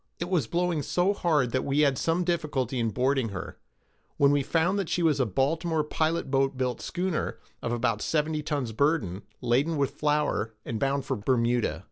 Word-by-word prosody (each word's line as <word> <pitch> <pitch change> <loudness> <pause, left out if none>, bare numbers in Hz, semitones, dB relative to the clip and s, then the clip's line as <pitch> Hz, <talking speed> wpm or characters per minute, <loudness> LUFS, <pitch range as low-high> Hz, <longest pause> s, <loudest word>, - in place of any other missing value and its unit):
It 175 +2 -4
was 160 -11 +1
blowing 175 +1 0
so 180 +7 +1
hard 150 - +1
that 130 - 0
we 140 +2 +1
had 140 -3 +4
some 165 +6 0
difficulty 150 -8 -1
in 115 -1 +1
boarding 130 +2 +1
her, 95 -2 -7 0.6
when 140 0 +5
we 145 0 +3
found 165 +7 +1
that 195 - -2
she 175 - 0
was 155 -4 +3
a 130 - +2
Baltimore 155 - 0
pilot 155 -1 -1
boat 135 0 +1
built 125 -1 -1
schooner, 180 -2 -2 0.2
of 115 - -2
about 115 -3 0
seventy 155 0 0
tons 145 -6 -2
burden, 110 - 0 0.2
laden 140 +7 +1
with 140 -2 +1
flour, 150 -7 0
and 110 - -3
bound 135 +1 0
for 135 - -1
Bermuda. 120 +1 +1
140 Hz, 185 wpm, -27 LUFS, 125-160 Hz, 0.6 s, when